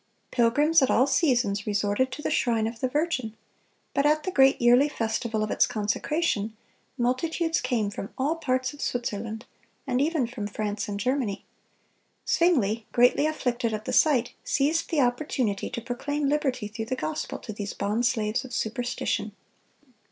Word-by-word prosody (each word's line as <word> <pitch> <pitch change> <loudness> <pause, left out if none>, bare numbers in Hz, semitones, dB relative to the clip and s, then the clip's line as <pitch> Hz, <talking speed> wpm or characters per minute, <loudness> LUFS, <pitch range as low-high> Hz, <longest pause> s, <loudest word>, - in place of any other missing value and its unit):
(246) - - -12
Pilgrims 290 +7 +4
at 265 - +3
all 255 - +4
seasons 245 - +1
resorted 205 +5 +1
to 300 +3 -7
the - - -1
shrine 230 -3 +1
of 225 +1 -4
the 260 - 0
Virgin, 255 -6 -1 0.6
but 280 - +2
at 305 +1 +3
the 370 - -2
great 270 -5 +5
yearly 245 +4 +5
festival 225 -3 -2
of 215 - -3
its - - +3
consecration, 215 +1 -1 0.4
multitudes 320 +7 0
came 235 -5 0
from 200 - -6
all 295 +5 0
parts 255 -4 -1
of 290 - -11
Switzerland, 220 -2 -3 0.4
and 255 -2 0
even 305 -3 +1
from 230 -3 -5
France 210 0 -3
and 200 -1 -4
Germany. 250 -3 -1 0.8
Zwingle, 240 - +2
greatly 245 +5 +4
afflicted 240 -7 -1
at 215 0 -7
the - - -3
sight, 255 -6 +3
seized 305 +4 +1
the 310 -3 +2
opportunity 245 -5 0
to 245 -2 -5
proclaim 280 +5 -2
liberty 270 -6 0
through 220 +1 -5
the 255 +3 -2
gospel 155 -9 -4
to 215 - -8
these 205 -1 -5
bond 215 +4 0
slaves 225 0 -1
of 250 -2 -7
superstition. 245 +3 -2
245 Hz, 165 wpm, -26 LUFS, 220-285 Hz, 0.8 s, great